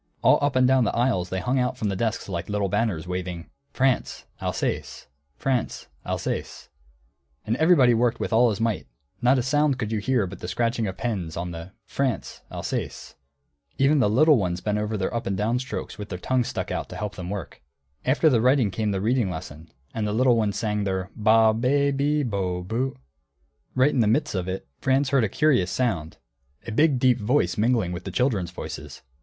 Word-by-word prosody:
All - - +6
up 145 -2 +1
and 130 0 +5
down 130 -1 +4
the 110 - 0
aisles 115 -8 +1
they 95 - -2
hung 125 +7 0
out 125 0 0
from 110 -4 -1
the 95 - -2
desks 110 +3 -2
like 85 -1 -4
little 100 -1 0
banners, 105 -5 -1
waving: 90 -2 -5 0.2
France: 130 -1 0 0.2
Alsace. - - -3 0.3
France: 130 -4 -2
Alsace. - - -4 0.8
And 110 +1 0
everybody 155 -7 +5
worked 115 0 +1
with - - -2
all 120 +2 +5
his 105 -1 -2
might, 115 -3 -1 0.3
not 125 +2 +4
a 125 - +1
sound 145 +1 +2
could 110 -4 -3
you 110 - 0
hear 120 0 +1
but 95 +1 -8
the - - -6
scratching 115 +4 0
of 95 - -5
pens 95 -10 -3
on 85 +1 -3
the 85 +3 -8
"France: 135 -4 -2
Alsace." - - -5 0.6
Even 140 +2 +4
the 105 - +3
little 150 +7 +5
ones 90 -2 -1
bent 105 +2 -1
over 105 +1 -2
their 95 - -2
up 115 - -3
and 95 -1 -1
down 115 +5 +1
strokes 130 -4 -6
with 105 - -6
their 90 - -4
tongues 125 +6 0
stuck - - -4
out - - -3
to - - -8
help 105 -1 -4
them 90 -2 -7
work. 100 -5 -6 0.4
After 140 +5 +3
the 125 -7 +4
writing 125 -4 +3
came 105 +3 -1
the 95 -2 -1
reading 115 -1 +1
lesson, 80 -2 -8 0.2
and 110 -2 -2
the 105 - -1
little 125 +2 +4
ones 105 -3 0
sang 105 -2 -1
their 95 -2 -2
ba, 110 +1 +4
be, 140 +5 +2
bi, 145 +2 +1
bo, 90 -4 -2
bu. 120 +8 -2 0.8
Right 130 +3 +4
in 130 - 0
the 110 - +4
midst 110 - +1
of 90 -2 -2
it, 95 -6 -4
Franz 135 +1 +2
heard 135 -5 +4
a - - -2
curious 130 -8 +2
sound, 90 -6 -1 0.5
a - - -5
big 145 +4 +3
deep 125 -1 +3
voice 105 -5 +1
mingling 110 -4 +1
with 90 0 -5
the - - -3
children's 110 -9 0
voices. 90 - -8
110 Hz, 205 wpm, -25 LUFS, 95-130 Hz, 0.8 s, All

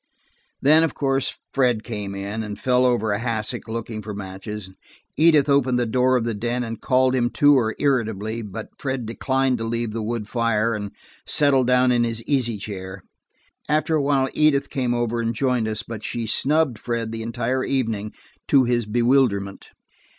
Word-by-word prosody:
Then, 155 +4 +6
of 165 - -1
course, 135 -1 0 0.2
Fred 125 -5 +2
came 105 -4 -5
in, 100 +3 -4
and 105 -2 -5
fell 125 +2 +2
over 110 -3 +1
a 100 - 0
hassock 115 -2 -3
looking 110 -1 -5
for 105 -1 -7
matches. 95 0 -7 0.4
Edith 155 -3 +5
opened 135 -3 +3
the 120 - +1
door 125 +3 +2
of 120 - -1
the 115 0 -1
den 120 +4 -2
and 115 -1 -6
called 130 0 +2
him 120 -2 +1
to 145 0 +5
her 110 -3 0
irritably, 110 -5 -1
but 110 +1 -7
Fred 130 -3 -3
declined 130 +2 0
to - - -3
leave 115 0 -2
the 115 +1 -4
wood 110 -1 -3
fire, 115 -1 +1
and 105 -2 -4 0.4
settled 135 -4 +3
down 125 0 +4
in 120 -1 +3
his 115 -1 -3
easy 125 -5 0
chair. 95 -2 -7 0.7
After 155 +2 +1
a 155 - +3
while 140 -1 +2
Edith 150 -2 +2
came 125 -4 0
over 120 0 -1
and 115 0 -2
joined 125 -2 +1
us, 110 0 -3
but 115 -2 -7
she 115 +1 -3
snubbed 140 +1 +1
Fred 115 -1 -3
the 115 0 -5
entire 120 +3 -2
evening, 110 -6 -1 0.4
to 135 -2 +5
his 120 -2 0
bewilderment. 115 -4 +1
120 Hz, 180 wpm, -23 LUFS, 110-130 Hz, 0.7 s, Then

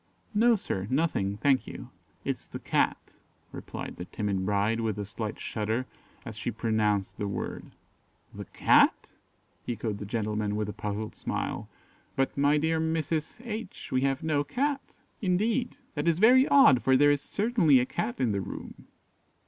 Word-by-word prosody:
"No, 230 +3 +5
sir, 95 - -3
nothing, 130 -9 0
thank 130 +3 +2
you; - - -9 0.3
it - - 0
is - - -20
the - - -7
Cat," - - +1 0.5
replied - - -7
the 90 - -6
timid 100 -2 -2
bride, 105 +2 +1
with 110 -3 -1
a 105 - -3
slight 105 +2 -5
shudder, 110 +3 -2 0.4
as 115 -3 -7
she 110 +2 -3
pronounced 110 -3 0
the 105 - -1
word. 100 - -4 0.7
"The - - -7
Cat?" - - +4 0.6
echoed 110 -3 -3
the 105 - -6
gentleman, 105 -1 -1
with 105 -1 -1
a - - -5
puzzled 105 +1 -4
smile; - - -4 0.5
"but, 135 0 0
my 145 +2 +3
dear 160 +2 +1
Mrs. 160 -1 -1
H, 230 0 -6
we 130 - +2
have 135 0 0
no 150 -2 +1
Cat!" 275 - -1 0.4
"Indeed! 220 +7 0 0.2
that 145 +2 -2
is 165 -1 +3
very 250 +7 +6
odd, 270 - +6
for 130 0 +4
there 145 +1 +5
is 145 -1 +1
certainly 200 - +3
a 125 - +1
Cat 120 -1 -3
in 125 -4 +2
the 100 -1 -1
room." - - -8
130 Hz, 165 wpm, -28 LUFS, 105-160 Hz, 0.7 s, very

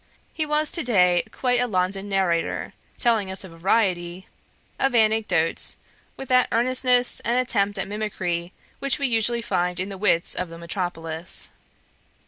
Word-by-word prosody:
He 310 -1 -2
was 300 0 +1
to 340 - +1
day 180 -7 +4
quite 245 -2 0
a 245 - +1
London 195 0 -1
narrator, 185 -4 0 0.2
telling 225 -5 +2
us 190 +1 -2
a 190 - -9
variety 175 0 0 0.5
of 270 -2 +1
anecdotes 215 -7 +1 0.4
with 270 - -7
that 255 -1 +4
earnestness 250 +1 +2
and 235 +3 0
attempt 205 -5 +1
at 195 - -3
mimicry 190 -5 -3 0.3
which 275 -1 +1
we 280 - -1
usually 235 -1 +1
find 180 -4 -1
in 185 +2 -2
the 195 -1 -7
wits 180 -4 +3
of 180 -1 -3
the 165 - -9
metropolis. 170 -1 -4
200 Hz, 150 wpm, -24 LUFS, 180-240 Hz, 0.5 s, day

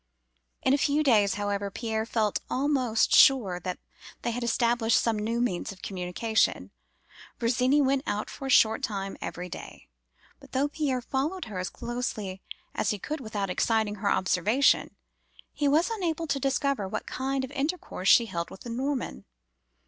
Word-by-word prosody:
"In 260 - +3
a 285 - +3
few 295 +2 +2
days, 210 -8 +4
however, 205 -1 -2
Pierre 220 +1 -3
felt 215 -3 0
almost 260 -4 +1
sure 210 -10 +6
that 180 0 -4 0.5
they 235 - 0
had 240 +1 -3
established 235 -1 +2
some 225 -2 0
new 230 +3 -1
means 210 -8 -1
of 190 - -14
communication. 195 +4 0 0.7
Virginie 250 +4 +2
went 270 0 +2
out 205 +1 -1
for 270 - -7
a - - -4
short 220 -3 +5
time 195 -2 -3
every 180 +1 -5
day; - - -10 0.5
but - - -17
though 275 +3 +1
Pierre 275 -5 -1
followed 300 +9 -2
her 205 -5 -6
as 185 - -2
closely 215 -6 -4 0.3
as 200 - 0
he 210 - 0
could 305 - -4
without 210 -6 -3
exciting 220 +1 +1
her 200 0 0
observation, 205 +10 +2 0.6
he 290 - 0
was 320 +9 +3
unable 335 -7 -2
to 280 -3 -1
discover 275 -5 0
what - - -4
kind 265 0 -2
of 265 - -13
intercourse 285 - -2
she 235 - +7
held 170 -5 -4
with - - -12
the 235 - -7
Norman. 255 - -3
235 Hz, 165 wpm, -28 LUFS, 205-270 Hz, 0.7 s, she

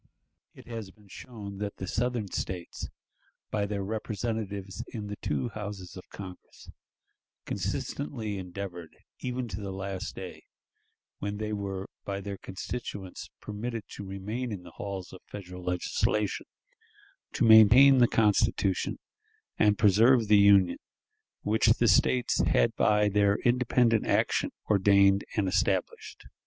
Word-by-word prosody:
It - - -14
has 115 -4 -6
been 105 0 -21
shown 100 -4 -9
that 105 -1 -4
the 95 - -5
Southern 115 -1 -2
States, 90 -2 -5 0.6
by 105 -1 0
their 100 -1 -3
representatives 105 -1 -4
in 110 -4 -6
the 105 0 -5
two 125 - -2
Houses 105 -4 -7
of 90 - -11
Congress, 95 -2 -11 0.7
consistently 100 +6 -3
endeavored 90 -2 -7 0.2
even 125 -1 -3
to 100 +1 -5
the 100 -1 -5
last 95 -1 -5
day, - - -9 0.7
when 100 0 -3
they 105 0 -3
were 100 -1 -4 0.2
by 100 -1 -3
their 100 0 -6
constituents 95 -1 -6
permitted 110 +2 -5
to - - -8
remain 105 +6 -4
in 95 -4 -6
the - - -12
halls 95 -3 -6
of 95 - -11
Federal 90 -3 -9
legislation, 90 +3 -1 0.9
to - - +1
maintain 115 +5 +8
the 120 - +6
Constitution, 105 -3 +1 0.6
and 105 -1 +4
preserve 110 +3 +5
the 105 0 +6
Union 100 -3 +5 0.6
which 110 +2 +2
the 120 +1 +4
States 125 +2 +3
had - - +2
by 105 0 +3
their 100 0 +3
independent 120 -2 +3
action - - +1 0.2
ordained 100 -1 +4
and 105 -3 +1
established. 90 +1 -1
100 Hz, 130 wpm, -29 LUFS, 95-110 Hz, 0.9 s, maintain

